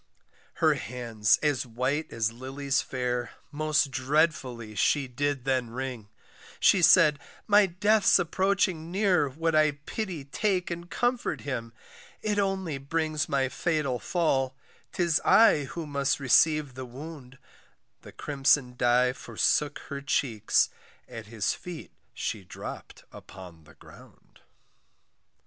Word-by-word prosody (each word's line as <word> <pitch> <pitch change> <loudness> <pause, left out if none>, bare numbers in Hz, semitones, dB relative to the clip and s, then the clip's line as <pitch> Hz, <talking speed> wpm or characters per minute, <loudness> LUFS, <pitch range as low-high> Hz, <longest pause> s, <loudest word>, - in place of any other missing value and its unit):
Her - - +3
hands 115 -2 0
as 145 -4 +1
white 130 +6 -2
as 115 -1 -1
lilies 135 +3 -2
fair, 125 -1 -3 0.2
Most 150 -1 +1
dreadfully 130 -5 0
she 140 +6 +1
then 140 +1 -2
did 130 -1 0
wring 125 -3 -6 0.5
She 190 - +4
said, 160 -4 +6 0.3
my 205 -1 +5
death's 205 +4 +3
approaching 185 -1 0
near, 180 -6 +2
Would 165 +4 -2
I 155 -1 +4
pity 185 -10 -4
take 185 +4 -1
and 170 0 -6
comfort 245 0 -1
him 115 -5 -5 0.5
It 210 -1 0
only 190 -7 -1
brings 155 +1 -2
my 135 -1 +1
fatal 140 -3 -1
fall, 135 -7 0 0.4
'Tis 170 -3 +1
I 185 -10 +5
who 165 +4 -6
must 140 -1 -1
receive 145 +1 +3
the 130 0 -7
wound 135 +1 -10 0.6
The - - -12
crimson 135 -3 +1
dye 125 +1 +3
forsook 130 +4 0
her 140 -1 -5
cheeks, 115 -6 +1 0.4
At 115 -2 -9
his 110 -2 -1
feet 175 -3 -9 0.2
she 105 - -4
dropp'd 90 - -9
upon 90 -4 -13
the 80 - -18
ground. - - -18
140 Hz, 125 wpm, -27 LUFS, 125-165 Hz, 0.6 s, said